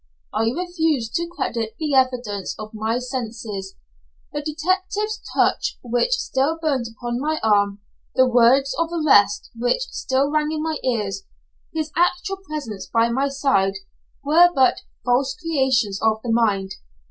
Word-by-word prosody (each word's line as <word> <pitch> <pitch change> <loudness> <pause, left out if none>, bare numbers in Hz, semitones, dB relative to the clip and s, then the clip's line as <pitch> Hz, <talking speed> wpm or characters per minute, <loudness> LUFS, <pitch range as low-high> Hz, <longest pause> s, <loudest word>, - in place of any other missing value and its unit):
I 225 - +1
refused 320 -6 -1
to 340 0 -1
credit 230 -10 -3
the 305 -3 -2
evidence 245 -7 0
of 215 0 -8
my 220 +2 -1
senses: 225 -6 -5 0.6
the 295 - -2
detective's 370 +8 -1
touch, - - +1
which 245 - +1
still 320 - 0
burnt 280 -7 0
upon 240 +2 -4
my 310 +3 -1
arm; 205 -2 +2 0.3
the 260 0 +5
words 250 +3 +4
of 335 0 +1
arrest, 285 -12 +3
which 245 - 0
still 270 +2 0
rang 305 0 +1
in 310 -1 -2
my 320 -1 -1
ears; 205 -6 -1 0.5
his 315 -1 -3
actual 355 +3 +1
presence 300 - -6
by 230 0 +2
my 265 +4 +1
side 270 -9 +1 0.5
were 330 +5 +6
but 260 -1 +3 0.2
"false 255 +2 +2
creations 265 - +1
of 220 -1 +2
the 235 - -2
mind." 205 -4 +1
260 Hz, 145 wpm, -22 LUFS, 225-310 Hz, 0.6 s, were